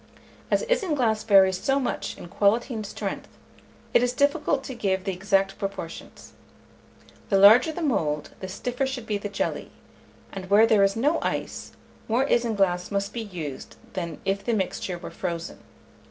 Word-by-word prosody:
As -, -, +2 dB
isinglass 300 Hz, -, +1 dB
varies 190 Hz, -3 st, +5 dB
so 270 Hz, 0 st, +2 dB
much 260 Hz, -, -3 dB
in -, -, -9 dB
quality 215 Hz, +8 st, +1 dB
and 220 Hz, -2 st, -4 dB
strength, -, -, -5 dB, 0.7 s
it -, -, +5 dB
is 245 Hz, 0 st, +1 dB
difficult 285 Hz, 0 st, +1 dB
to 265 Hz, -, -6 dB
give 190 Hz, -5 st, -1 dB
the 195 Hz, -, -1 dB
exact 195 Hz, +1 st, 0 dB
proportions. 195 Hz, -4 st, -7 dB, 1.0 s
The 195 Hz, -, +3 dB
larger 220 Hz, +9 st, +7 dB
the 335 Hz, +2 st, -5 dB
mould, 150 Hz, -, -1 dB
the 190 Hz, -, -6 dB
stiffer 250 Hz, +7 st, -2 dB
should 260 Hz, -3 st, -5 dB
be 210 Hz, -2 st, -2 dB
the 205 Hz, -, -5 dB
jelly; 200 Hz, -, -3 dB, 0.6 s
and 190 Hz, -1 st, -7 dB
where 210 Hz, +3 st, +7 dB
there 215 Hz, -3 st, +4 dB
is 195 Hz, 0 st, +2 dB
no 290 Hz, +8 st, +2 dB
ice, -, -, -4 dB, 0.3 s
more 240 Hz, +4 st, +2 dB
isinglass 195 Hz, -8 st, +1 dB
must 200 Hz, 0 st, -2 dB
be 235 Hz, -, -3 dB
used 170 Hz, -10 st, -7 dB, 0.2 s
than 170 Hz, -3 st, -4 dB
if 195 Hz, +1 st, -1 dB
the 235 Hz, 0 st, 0 dB
mixture 190 Hz, -2 st, -2 dB
were 170 Hz, -, -9 dB
frozen. 170 Hz, -2 st, -5 dB
205 Hz, 165 wpm, -25 LUFS, 190-245 Hz, 1.0 s, larger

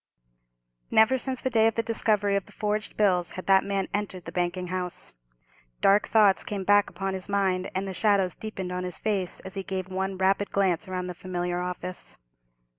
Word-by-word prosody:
Never 240 Hz, +4 st, +4 dB
since 260 Hz, +1 st, -3 dB
the 260 Hz, -, -1 dB
day 225 Hz, -1 st, +4 dB
of 225 Hz, -, 0 dB
the 230 Hz, -, 0 dB
discovery 210 Hz, -3 st, +2 dB
of 200 Hz, -, -1 dB
the -, -, -15 dB
forged 210 Hz, 0 st, -2 dB
bills 180 Hz, -5 st, +2 dB
had 185 Hz, -, -7 dB
that 190 Hz, -1 st, +5 dB
man 195 Hz, -1 st, -1 dB
entered 200 Hz, -3 st, -3 dB
the 165 Hz, -, -6 dB
banking 180 Hz, +1 st, -2 dB
house. 180 Hz, -, -3 dB, 0.7 s
Dark 200 Hz, +1 st, +4 dB
thoughts 210 Hz, -3 st, +4 dB
came 200 Hz, -2 st, -4 dB
back 205 Hz, +1 st, +4 dB
upon 195 Hz, +2 st, -3 dB
his 190 Hz, +1 st, -5 dB
mind, 190 Hz, -2 st, +1 dB
and 190 Hz, +1 st, -1 dB
the 190 Hz, -, -4 dB
shadows 195 Hz, -2 st, +2 dB
deepened 195 Hz, -4 st, -6 dB
on 180 Hz, 0 st, -3 dB
his 180 Hz, -1 st, -3 dB
face 200 Hz, -5 st, -2 dB
as 190 Hz, -, -9 dB
he 195 Hz, -, -2 dB
gave 190 Hz, -1 st, -4 dB
one 190 Hz, 0 st, -2 dB
rapid 195 Hz, +2 st, +2 dB
glance 190 Hz, -1 st, +1 dB
round 185 Hz, -1 st, -3 dB
the 180 Hz, -, -4 dB
familiar 175 Hz, 0 st, -3 dB
office. 180 Hz, 0 st, -6 dB
190 Hz, 195 wpm, -27 LUFS, 180-205 Hz, 0.7 s, that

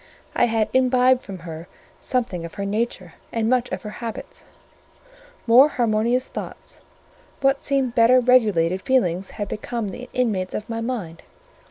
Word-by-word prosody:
I -, -, +4 dB
had 225 Hz, -2 st, 0 dB
imbibed 255 Hz, 0 st, +4 dB
from 195 Hz, -5 st, -8 dB
her 165 Hz, 0 st, -8 dB, 0.3 s
something 235 Hz, -10 st, -2 dB
of 170 Hz, -, -8 dB
her 200 Hz, -1 st, -3 dB
nature 200 Hz, -4 st, -3 dB, 0.2 s
and 225 Hz, -1 st, -1 dB
much 250 Hz, 0 st, +1 dB
of -, -, -4 dB
her 210 Hz, -, -6 dB
habits: 230 Hz, -2 st, -7 dB, 1.0 s
more 250 Hz, +5 st, +7 dB
harmonious 240 Hz, 0 st, +1 dB
thoughts: -, -, -8 dB, 0.6 s
what 270 Hz, 0 st, +2 dB
seemed 270 Hz, -4 st, 0 dB
better 240 Hz, +2 st, +5 dB
regulated 210 Hz, -8 st, +3 dB
feelings 190 Hz, -9 st, +1 dB
had 205 Hz, -, -3 dB
become 230 Hz, +1 st, -4 dB
the 250 Hz, +5 st, -9 dB
inmates 210 Hz, -8 st, -1 dB
of 210 Hz, -, -5 dB
my 230 Hz, 0 st, -4 dB
mind. 215 Hz, -9 st, -4 dB
230 Hz, 150 wpm, -22 LUFS, 200-250 Hz, 1.0 s, more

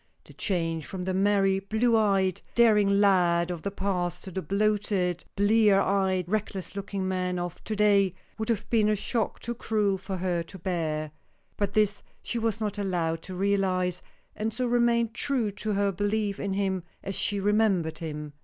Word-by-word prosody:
The -, -, -15 dB
change 165 Hz, -5 st, -2 dB
from 185 Hz, -2 st, -5 dB
the 185 Hz, +1 st, -2 dB
merry, 195 Hz, 0 st, +3 dB
blue 220 Hz, +4 st, +1 dB
eyed, 195 Hz, -4 st, +2 dB
daring 215 Hz, -4 st, +5 dB
lad 180 Hz, -4 st, +3 dB
of 175 Hz, -2 st, -5 dB
the 200 Hz, -, -2 dB
past 180 Hz, -3 st, -2 dB
to 190 Hz, -, -8 dB
the 190 Hz, -, -3 dB
bloated, 200 Hz, -3 st, 0 dB
blear 205 Hz, 0 st, +4 dB
eyed, 190 Hz, -2 st, +1 dB
reckless 200 Hz, -2 st, -3 dB
looking 195 Hz, -1 st, -3 dB
man 180 Hz, -1 st, -1 dB
of 175 Hz, -1 st, -5 dB
to 215 Hz, -, -2 dB
day 200 Hz, -3 st, +3 dB, 0.2 s
would 220 Hz, -, -3 dB
have 220 Hz, -3 st, -1 dB
been 215 Hz, -3 st, +4 dB
a 215 Hz, -, +3 dB
shock 225 Hz, +2 st, -2 dB
too 235 Hz, -, -3 dB
cruel 210 Hz, -4 st, 0 dB
for 190 Hz, 0 st, -5 dB
her 175 Hz, -1 st, -1 dB
to 170 Hz, +3 st, -10 dB
bear. 160 Hz, -4 st, -2 dB, 0.4 s
But 200 Hz, -1 st, -1 dB
this 210 Hz, -1 st, +2 dB, 0.2 s
she 235 Hz, -, -2 dB
was 225 Hz, -2 st, -1 dB
not 210 Hz, -1 st, -3 dB
allowed 170 Hz, -4 st, -1 dB
to 185 Hz, -, -7 dB
realize, 185 Hz, -2 st, 0 dB, 0.3 s
and 220 Hz, +1 st, -2 dB
so 250 Hz, +3 st, -1 dB
remained 235 Hz, -1 st, +2 dB
true 245 Hz, -5 st, 0 dB
to 210 Hz, +2 st, -3 dB
her 200 Hz, 0 st, +1 dB
belief 205 Hz, +1 st, -1 dB
in 200 Hz, -1 st, -2 dB
him, 190 Hz, -1 st, 0 dB, 0.2 s
as 195 Hz, -, -4 dB
she 205 Hz, -, 0 dB
remembered 200 Hz, -5 st, +1 dB
him. 150 Hz, -2 st, -6 dB
195 Hz, 180 wpm, -27 LUFS, 180-210 Hz, 0.4 s, daring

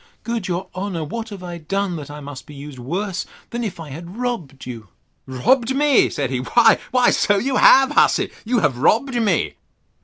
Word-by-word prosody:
Good 230 Hz, -4 st, -3 dB
your 180 Hz, 0 st, -3 dB
honour, 185 Hz, -3 st, -3 dB
what 225 Hz, +9 st, -5 dB
have 200 Hz, -3 st, -9 dB
I 175 Hz, -1 st, -6 dB
done, 195 Hz, +3 st, -2 dB
that 145 Hz, -2 st, -8 dB
I 150 Hz, 0 st, -8 dB
must 145 Hz, -2 st, -9 dB
be 150 Hz, -, -11 dB
used 140 Hz, -1 st, -9 dB
worse 185 Hz, +9 st, -3 dB, 0.2 s
than 240 Hz, 0 st, -3 dB
if 200 Hz, -6 st, -5 dB
I 160 Hz, -2 st, -8 dB
had 170 Hz, +7 st, -9 dB
robbed 205 Hz, -, -4 dB
you? 115 Hz, -4 st, -8 dB, 0.4 s
Robbed 235 Hz, -, +1 dB
me! 290 Hz, -1 st, +4 dB
said 135 Hz, -2 st, -3 dB
he, 130 Hz, -, -1 dB
why 240 Hz, -, +3 dB
so 205 Hz, -1 st, +2 dB
you 260 Hz, +5 st, 0 dB
have, 270 Hz, 0 st, +6 dB
hussy; -, -, +3 dB
you 235 Hz, 0 st, +1 dB
have 125 Hz, -3 st, +1 dB
robbed 235 Hz, -, +2 dB
me. 215 Hz, -9 st, 0 dB
185 Hz, 190 wpm, -21 LUFS, 145-235 Hz, 0.4 s, have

